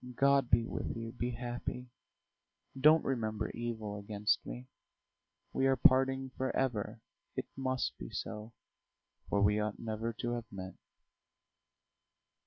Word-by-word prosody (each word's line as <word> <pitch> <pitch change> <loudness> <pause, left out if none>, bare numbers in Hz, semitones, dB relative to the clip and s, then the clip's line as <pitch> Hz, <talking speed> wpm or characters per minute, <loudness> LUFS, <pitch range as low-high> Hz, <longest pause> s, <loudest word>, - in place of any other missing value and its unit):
"God 140 -1 +4
be 115 +1 +5
with 115 - -3
you; 115 0 -4
be 120 +1 -2
happy. 120 +1 -4 0.8
Don't 155 +4 +6
remember 110 -5 -1
evil 110 -3 -4
against 105 +1 +1
me. 125 - -6 0.9
We 135 - +3
are 135 - +5
parting 135 -1 +4
forever 130 -5 -1 0.3
it - - -2
must 130 -1 -1
be - - -6
so, 110 +1 -5 0.8
for 100 0 +3
we 105 +1 +4
ought 105 -1 -1
never 110 0 -2
to 120 +1 -3
have 120 -1 -4
met. 95 -1 -6
120 Hz, 125 wpm, -34 LUFS, 110-130 Hz, 0.9 s, Don't